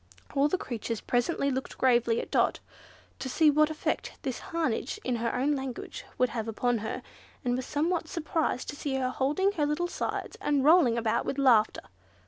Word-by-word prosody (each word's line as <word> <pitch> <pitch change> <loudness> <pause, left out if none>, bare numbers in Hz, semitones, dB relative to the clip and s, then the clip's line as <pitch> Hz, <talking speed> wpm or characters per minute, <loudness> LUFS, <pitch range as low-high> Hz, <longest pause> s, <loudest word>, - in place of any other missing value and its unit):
All 280 +1 +3
the 370 - 0
creatures 230 -6 -4
present 245 +7 0
looked 270 -1 -1
gravely 240 -3 +3
at - - -6
Dot, - - +2 0.6
to 260 - -4
see 305 +3 +4
what 305 +1 +4
effect 315 - -2
this 260 -3 -3
harangue 320 -9 -1 0.2
in 250 -2 0
her 230 0 -1
own 265 +4 +1
language 270 - -4
would 250 - +3
have 230 -2 -4
upon 235 +1 0
her, 220 - -4 0.4
and 245 0 +2
were 255 - -1
somewhat 320 +5 -1
surprised 320 -5 -1
to - - -5
see 285 -1 -3
her 255 -1 0
holding 300 +11 +1
her 310 -7 0
little 310 +4 0
sides, - - -4
and 285 -2 +1
rolling 300 -7 +6
about 225 -2 +1
with 275 - -3
laughter. 245 -6 +4
265 Hz, 185 wpm, -29 LUFS, 245-305 Hz, 0.6 s, rolling